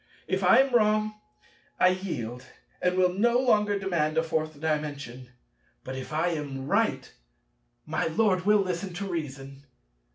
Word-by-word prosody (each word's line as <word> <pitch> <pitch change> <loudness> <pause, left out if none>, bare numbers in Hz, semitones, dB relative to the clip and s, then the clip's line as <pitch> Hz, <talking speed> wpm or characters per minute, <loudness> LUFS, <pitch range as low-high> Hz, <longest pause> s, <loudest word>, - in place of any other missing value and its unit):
If - - -1
I - - +6
am 265 0 +3
wrong, 215 -1 +2 0.6
I 185 - +6
yield, 145 - -4 0.4
and 180 0 +1
will 180 -1 +3
no 235 +5 +3
longer 210 -5 +2
demand 170 -5 -1
a 160 - +3
Fourth 155 -2 -2
Dimension; 145 -5 -3 0.5
but, 130 - -6
if 130 +2 -7
I 160 +3 +1
am 145 -5 -4
right, 140 - 0 0.7
my - - -1
Lord 185 +1 +1
will 210 -1 +5
listen 185 0 -3
to 200 +3 -4
reason. 140 -5 -6
175 Hz, 150 wpm, -27 LUFS, 150-200 Hz, 0.7 s, I